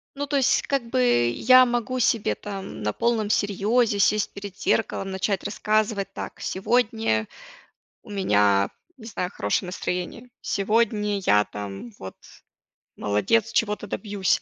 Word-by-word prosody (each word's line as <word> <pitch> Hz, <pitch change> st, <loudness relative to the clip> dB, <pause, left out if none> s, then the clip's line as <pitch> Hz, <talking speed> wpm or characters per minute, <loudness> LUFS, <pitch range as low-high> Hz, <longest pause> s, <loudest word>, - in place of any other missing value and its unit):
Ну, 285 Hz, +1 st, -3 dB
то 285 Hz, -, -2 dB
есть 265 Hz, -, +3 dB
как 275 Hz, -3 st, 0 dB
бы 120 Hz, -, +3 dB
я 255 Hz, -, +6 dB
могу 240 Hz, +1 st, -1 dB
себе 230 Hz, -3 st, +1 dB
там 195 Hz, -, -7 dB
на 105 Hz, -, 0 dB
полном 230 Hz, -3 st, 0 dB
серьёзе 210 Hz, +2 st, +1 dB
сесть 210 Hz, +1 st, +2 dB
перед 200 Hz, -1 st, -8 dB
зеркалом, 195 Hz, -3 st, 0 dB
начать 190 Hz, 0 st, -1 dB
рассказывать: 215 Hz, -1 st, 0 dB
"Так, -, -, -6 dB
сегодня 220 Hz, -, 0 dB, 0.8 s
у -, -, -16 dB
меня, 105 Hz, -, +2 dB, 0.3 s
не 225 Hz, -, -13 dB
знаю, 200 Hz, -5 st, -3 dB
хорошее 100 Hz, -, -1 dB
настроение. 180 Hz, +4 st, -4 dB, 0.2 s
Сегодня 210 Hz, 0 st, +1 dB
я 105 Hz, -, +4 dB
там, 100 Hz, +2 st, -8 dB
вот, 95 Hz, 0 st, -8 dB, 0.8 s
молодец, 210 Hz, -, +1 dB
чего-то 210 Hz, -1 st, 0 dB
добьюсь". 200 Hz, -2 st, -1 dB
205 Hz, 135 wpm, -24 LUFS, 180-225 Hz, 0.8 s, я